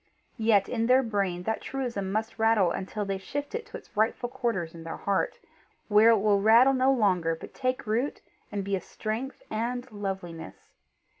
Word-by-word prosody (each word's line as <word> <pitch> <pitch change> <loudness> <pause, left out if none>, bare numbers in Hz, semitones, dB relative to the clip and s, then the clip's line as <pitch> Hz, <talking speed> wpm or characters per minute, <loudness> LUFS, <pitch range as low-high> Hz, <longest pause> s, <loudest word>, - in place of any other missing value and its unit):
Yet 220 -3 +4
in 230 -1 -1
their 255 +2 +5
brain 195 -6 -1
that 220 +3 -2
truism 235 -8 -3
must 220 +2 -2
rattle 220 -5 +4
until 205 +4 -3
they 195 -1 -2
shift 285 - -5
it 465 0 -4
to - - -7
its - - -18
rightful 220 +3 +1
quarters 235 -10 -2
in 165 -1 -10
their 165 - -6
heart, 200 -1 -1 0.5
where 215 +2 +6
it 230 - +6
will 205 -1 +3
rattle 230 +6 +6
no 260 +1 +3
longer 185 -9 +2
but 160 - -11
take 255 -1 -2
root 230 +6 -1 0.3
and 200 -1 -2
be 200 0 -1
a 185 - -3
strength 230 +5 -5
and 245 +3 -3
loveliness. 190 - -6
215 Hz, 180 wpm, -28 LUFS, 195-245 Hz, 0.5 s, where